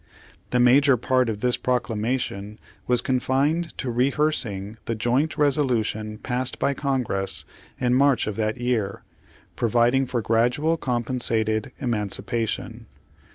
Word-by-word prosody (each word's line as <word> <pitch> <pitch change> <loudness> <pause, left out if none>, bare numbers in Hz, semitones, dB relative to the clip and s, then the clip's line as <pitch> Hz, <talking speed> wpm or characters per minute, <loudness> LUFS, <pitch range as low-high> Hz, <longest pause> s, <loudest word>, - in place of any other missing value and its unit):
The 125 - +1
major 130 +2 +5
part 130 +1 +1
of 105 -2 -4
this 125 -1 +2
proclamation 110 -3 -2 0.3
was 125 -1 +2
con 130 -1 +1
fined 150 +7 0
to 130 - -2
rehearsing 120 -6 0
the 115 - -2
joint 125 +8 0
resolution 120 -7 0
passed 125 +2 -3
by 140 - +1
Congress 125 -9 -2 0.3
in 125 -1 +1
March 135 -1 +3
of 105 - -3
that 110 +1 -1
year, 120 -5 -1 0.5
providing 120 +3 +2
for 120 -3 -2
gradual 125 +9 +2
compensated 120 -4 -1
emiancipation. 115 -1 -2
125 Hz, 120 wpm, -24 LUFS, 110-130 Hz, 0.5 s, major